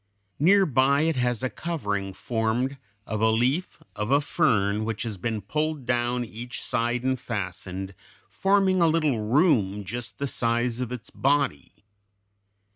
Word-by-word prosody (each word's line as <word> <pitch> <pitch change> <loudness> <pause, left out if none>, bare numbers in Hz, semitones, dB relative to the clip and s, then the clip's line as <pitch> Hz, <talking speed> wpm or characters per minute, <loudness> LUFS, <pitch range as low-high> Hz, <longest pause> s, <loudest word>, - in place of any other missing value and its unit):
Near 195 +6 +5
by 140 -1 +3
it 160 0 +1
has 125 -1 0
a 130 - +1
covering 105 - -3
formed 120 +6 -1 0.3
of 110 -1 -3
a 110 - +4
leaf 125 +10 0
of 105 0 -3
a 140 +1 +5
fern 105 -7 +1
which 110 +1 -3
it - - -2
has 110 +1 -2
pulled 155 -1 -1
down 120 0 0
each 120 +2 -7
side 120 +1 -1
and 130 -1 0
fastened, 95 -4 -5 0.3
forming 195 -2 +2
a 170 - +5
little 155 -7 +2
room 110 - +2
just 115 +5 -5
the 140 - -2
size 120 -2 0
of 125 -2 -3
its 125 -4 -7
body. 135 - -1
120 Hz, 150 wpm, -26 LUFS, 110-140 Hz, 0.3 s, Near